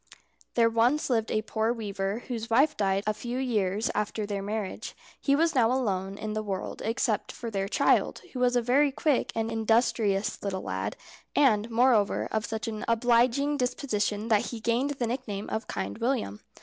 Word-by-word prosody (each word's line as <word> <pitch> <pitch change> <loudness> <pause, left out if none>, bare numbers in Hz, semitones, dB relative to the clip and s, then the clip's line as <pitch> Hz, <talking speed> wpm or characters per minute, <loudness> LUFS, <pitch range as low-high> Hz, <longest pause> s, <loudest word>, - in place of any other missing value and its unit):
There 230 -1 +5
once 240 +6 +2
lived 225 -2 +1
a 215 - 0
poor 220 +1 0
weaver, 205 -1 -3
whose 230 -2 -4
wife 280 +7 +4
died 195 -1 +1
a 215 - +1
few 240 +3 -5
years 215 -4 0
after 210 0 -2
their 205 -1 -3
marriage. 205 0 -4 0.2
He 280 - +2
was 330 +3 +2
now 240 -3 +3
alone 195 -6 -1
in 215 0 -4
the 215 - -1
world 195 -3 -4
except 220 -1 0
for 230 -1 -6
their 195 -2 -1
child, - - +2
who 255 - -4
was 250 0 +3
a 245 - +2
very 275 +4 +3
quick 280 0 +1
and 225 0 -1
industrious 220 -2 +1
little 190 -2 -3
lad, - - -3 0.4
and, 230 -6 +3
moreover, 230 -3 +3
of 220 0 -1
such 220 +1 -4
an 215 -1 -4
obliging 245 +5 +3
disposition 220 -5 -1
that 215 -2 +3
he 235 - -5
gained 245 +6 0
the 245 - 0
nickname 225 -4 -4
of 220 0 -3
Kind 95 +1 -4
William. 230 - -1
225 Hz, 180 wpm, -28 LUFS, 210-245 Hz, 0.4 s, There